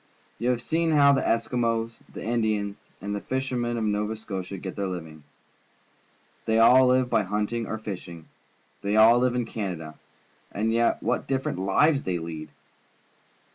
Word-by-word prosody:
You 120 - 0
have 120 -1 0
seen 165 +3 0
how 145 -2 +6
the 135 - +2
Eskimos, 115 -1 0 0.2
the - - -8
Indians, 110 -3 -1
and 100 +1 -3
the 105 - -3
fishermen 125 -3 -2
of 115 - -1
Nova 105 +1 -1
Scotia 100 -3 -6
get 95 0 -6
their 100 -1 -2
U\'ing. 80 -4 -7 1.2
They 110 0 +2
all 125 +3 +7
live 130 0 +3
b}"^ 110 -3 +3
hunting 105 +3 -2
or 110 - -3
fishing. 90 -6 -8 0.5
They 100 +1 -1
all 115 +3 +7
Uve 125 -1 +2
in 125 -1 0
Canada, 90 -9 -5 0.5
and 110 +2 -1
yet 115 0 +1
what - - -1
different 135 -8 -1
fives 135 +10 +3
thej' 90 -2 -2
lead! 80 -1 -7
110 Hz, 160 wpm, -26 LUFS, 100-120 Hz, 1.2 s, all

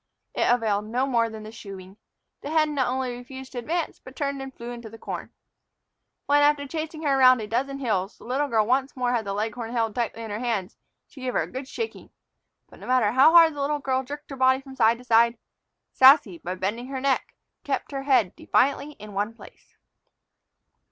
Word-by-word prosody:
It - - +2
availed 215 -4 +1
no 250 +4 0
more 235 -4 +1
than 220 -1 -9
the 215 - -9
shooing. 195 -3 -10 0.5
The 285 - -6
hen 310 -1 +2
not 265 -3 +1
only 255 -1 -2
refused 260 +2 -10
to 245 - -4
advance, 325 +7 -3
but 260 - -13
turned 280 -1 -2
and 270 0 -7
flew 240 -2 -8
into 235 -2 -8
the 225 - -12
corn. - - -6 0.9
When, 290 0 +4
after 290 -1 +3
chasing 315 +1 -5
her 275 -2 +2
around 255 -1 +7
a 215 - -4
dozen 265 +6 -2
hills, 210 -7 -2
the - - -16
little 270 +4 -1
girl 220 -5 +2
once 265 +4 0
more 250 -2 0
had 235 -3 0
the 200 - -3
leghorn 225 +3 -3
held 225 -3 0
tightly 230 -1 -3
in 220 - -6
her 210 - -3
hands, 225 -6 -2 0.3
she 270 - -14
gave 255 -1 -2
her - - +2
a - - -10
good 260 +1 -6
shaking. 455 - -6 0.6
But - - -17
no - - -10
matter 250 -5 +3
how 270 +7 +6
hard 330 -2 +8
the 290 - -5
little 295 +1 0
girl 265 -2 -1
jerked 290 +3 -9
her - - -5
body 260 0 +4
from 270 -1 -12
side 230 -1 +4
to 250 - -14
side, 235 0 +4 0.6
Sassy, 260 - +6
by 180 +1 -5
bending 210 +7 -3
her 270 -1 -4
neck, 270 0 -1 0.3
kept - - -3
her 275 -1 -3
head 255 -9 +2
defiantly 280 +2 +1
in 210 -4 -12
one 205 +3 -2
place. - - -17
255 Hz, 215 wpm, -25 LUFS, 225-275 Hz, 0.9 s, hard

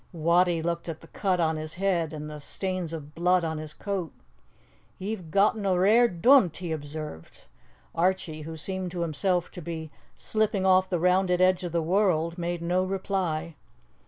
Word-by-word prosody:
Wattie 170 +1 +2
looked 170 0 -2
at 160 -1 -6
the 165 - -14
cut 185 -3 0
on 160 -1 +1
his 155 +1 -5
head 175 -4 0
and 150 -1 -6
the 150 0 -7
stains 185 +2 -3
of 150 -2 -7
blood 180 +1 +2
on 160 -1 -3
his 155 -1 -5
coat. 190 -1 -4 0.9
"Ye've 190 -4 -5
gotten 205 +4 +2
a 190 -2 +2
rare 220 +6 +5
dunt," 190 - +4
he 175 -3 -5
observed. 150 - -7 0.5
Archie, 170 -2 0
who 160 +1 -7
seemed 185 +3 -3
to 175 - -3
himself 175 +2 0
to 180 - -8
be 160 -1 -6 0.2
slipping 215 -3 0
off 185 0 +4
the 180 - +1
rounded 180 +1 +2
edge 185 0 +3
of 175 - -3
the 170 0 0
world, 170 -2 +1
made 170 0 -3
no 180 +2 +1
reply. 185 -4 -2
175 Hz, 175 wpm, -27 LUFS, 160-185 Hz, 0.9 s, rare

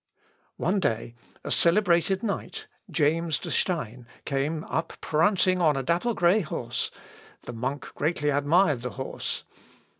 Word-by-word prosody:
One 190 +4 +1
day, 115 -7 -1 0.3
a - - -5
celebrated 180 +1 +3
knight, 205 -4 -3 0.2
James 160 +1 +1
de - - -6
Stein, 125 - -1 0.2
came 150 +3 -1
up 160 0 -3
prancing 185 +3 +2
on 155 -4 +4
a 135 - -1
dapple 175 - +1
grey 175 +4 +4
horse; 120 - -3 0.5
the 120 - -7
monk 130 +5 -4
greatly 150 -1 0
admired 145 0 +3
the 125 - -3
horse. 130 - -4
160 Hz, 130 wpm, -27 LUFS, 135-180 Hz, 0.5 s, on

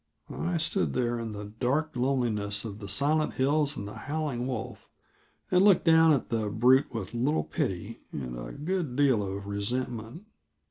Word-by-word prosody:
I 170 0 -1
stood 165 +4 0
there 120 -1 0
in 115 -1 -4
the 105 0 -6
dark 130 +9 -1
loneliness 120 -5 0
of 105 -2 -6
the 100 - -7
silent 150 +7 +2
hills 145 +2 +1
and 100 - -5
the 105 - -8
howling 145 -4 -3
wolf, 125 -5 -5 0.6
and 180 +1 +5
looked 200 -4 +5
down 160 -1 +6
at 140 -5 +1
the 110 -3 -1
brute 125 +6 +4
with 115 -2 -5
little 130 +7 +1
pity 115 - -3
and 65 -4 -5
a - - -7
good 155 -3 -3
deal 135 -6 +3
of 100 0 -4
resentment. 115 - -3
125 Hz, 170 wpm, -28 LUFS, 105-150 Hz, 0.6 s, down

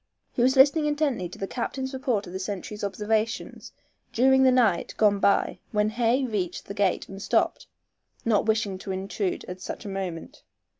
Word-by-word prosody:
He - - -2
was 260 +2 +4
listening 290 +3 +5
intently 290 - 0
to - - -11
the 195 - -3
captain's 260 +5 -4
report 255 -6 -1
of 175 - -10
the 190 - -4
sentries' 205 +2 -5
observations 215 +4 -2 0.4
during 265 +2 +4
the 260 -1 +6
night 230 -8 +2
gone 205 -2 +4
by 200 - +2
when 210 0 +2
Hay 240 +3 +2
reached 195 -7 -3
the 200 - -6
gate 200 -2 0
and 195 0 -9
stopped, - - 0 0.6
not 220 -1 +2
wishing 215 -4 0
to 195 - -6
intrude 190 0 -3
at 180 0 -8
such - - -6
a - - -4
moment. 185 -4 -5
215 Hz, 180 wpm, -26 LUFS, 195-255 Hz, 0.6 s, the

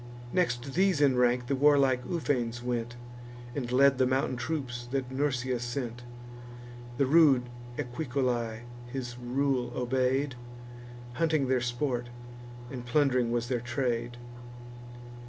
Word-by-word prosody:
Next 135 -7 0
these 190 -3 +3
in 140 -3 +4
rank, 125 0 +2
the 135 - 0
warlike 135 -2 +4
Ufens 120 -8 -1
went, 120 -1 -2 0.6
And 125 -3 -3
led 135 +1 +5
the 130 - +4
mountain 130 0 0
troops 125 -3 -4
that 130 -1 -2
Nursia 130 -2 0
sent. 120 -1 -4 1.0
The 140 - +3
rude 140 -3 +5 0.3
Equicolae 120 -3 -2 0.3
his 120 -1 -5
rule 125 0 0
obey'd; 130 +2 0 0.8
Hunting 155 +1 +1
their 130 -1 +2
sport, 120 0 -2 0.6
and 125 -3 -6
plund'ring 125 -1 +2
was 120 0 -1
their 125 -2 -1
trade. 120 -1 -2
125 Hz, 120 wpm, -29 LUFS, 120-140 Hz, 1.0 s, led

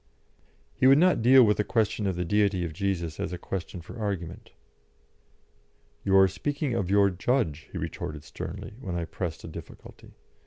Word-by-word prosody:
He 130 - +3
would 135 +1 +7
not 180 -4 +4
deal 130 +2 +7
with 105 -2 +3
the 105 - +2
question 110 -2 0
of 95 - -1
the 90 0 -2
Deity 100 -1 +1
of 80 - -5
Jesus 85 -3 -2
as - - -3
a 90 - -4
question 90 0 -5
for 115 - -10
argument. 95 -6 -4 1.5
"You 95 0 +4
are 95 0 +7
speaking 140 - -2
of 100 -6 -1
your 100 0 +4
Judge," 90 - -1
he - - -6
retorted 75 -1 -5
sternly, 80 - -7
when 90 -7 -4
I 85 -1 -2
pressed 80 0 -5
a - - -7
difficulty. - - -12
95 Hz, 180 wpm, -27 LUFS, 85-110 Hz, 1.5 s, would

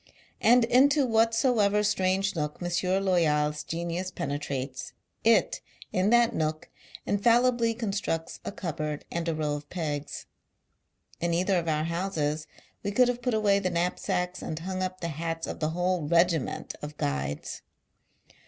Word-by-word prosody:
And 240 0 +6
into 275 +4 +4
what 225 -1 +3
soever 210 -5 +3
strange 195 -2 +1
nook 150 -2 -2
M. 185 +2 0
Loyal's 150 -5 +2
genius 170 +2 -3
pene 145 -6 -3
trates, 135 -2 -5 0.3
it, 225 -1 +3 0.3
in 185 +2 +2
that 240 0 +4
nook, 155 0 -2 0.4
infallibly 235 +2 +3
constructs 200 -7 -3
a - - -4
cupboard 155 -6 -4
and 170 0 -2
a 165 - -1
row 150 -1 -1
of 145 0 -6
pegs. 150 -4 -4 0.9
In 170 0 0
either 185 +1 +2
of 170 - -5
our 155 -1 +1
houses, 160 -3 -2 0.3
we 200 - -2
could 245 +4 +4
Lave 245 0 -2
put 245 -2 0
away 205 -2 +3
the 185 -2 -1
knap 175 +1 -1
sacks 180 -2 -2
and 155 - -4
hung 185 +3 -4
up 185 0 -3
the 170 - -2
hats, 165 +1 -3
of - - -6
the 155 - 0
whole 175 -1 0
regiment 170 -3 +1
of 150 0 -7
Guides. 70 +1 -3
175 Hz, 155 wpm, -28 LUFS, 155-205 Hz, 0.9 s, And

